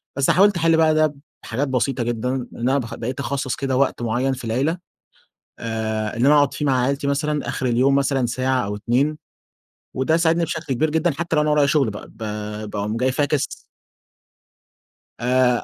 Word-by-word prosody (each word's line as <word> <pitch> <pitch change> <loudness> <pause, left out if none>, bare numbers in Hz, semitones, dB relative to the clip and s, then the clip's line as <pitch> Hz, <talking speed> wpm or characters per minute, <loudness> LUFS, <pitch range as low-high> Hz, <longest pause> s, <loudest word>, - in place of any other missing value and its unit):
بس 140 0 +1
حاولت 200 0 +5
أحل 165 0 +3
بقى 160 -1 +4
ده 155 -1 +2 0.3
بحاجات 130 +5 -2
بسيطة 130 -1 0
جدًا، 120 +1 -2
إن 125 -2 -4 0.2
أنا 135 - +3
باخ 115 -4 -4
بقيت 125 +4 -5
اخصّص 135 -1 -2
كده 135 -2 -1
وقت 135 -2 +1
معيّن 120 +3 0
في 125 -2 -7
العيلة، 135 +9 0 0.8
آآ، 110 -1 -3
إن 120 - +2
أنا 150 +2 +6
أقعد 145 -1 +3
فيه 150 - -3
مع 130 -3 +2
عيلتي 140 +2 -1
مثلًا 150 +1 -1
آخر 130 - -3
اليوم 130 +3 +3
مثلًا 135 -2 +1
ساعة 130 0 0
أو 105 +1 -3
2، 130 +8 0 0.8
وده 130 +5 +2
ساعدني 165 0 +2
بشكل 160 -4 -3
كبير 155 +5 +1
جدًا، 160 +3 +1
حتى 170 0 -2
لو 150 - +4
أنا 150 - +1
ورايا 150 -1 +4
شغل 140 -5 +2
بقى، 105 - -8
ب - - -20 0.5
باقوم 105 +2 -3
جاي 130 +2 +1
فاكس 145 +1 0 1.6
آآ 125 0 +2
135 Hz, 185 wpm, -22 LUFS, 120-150 Hz, 1.6 s, أنا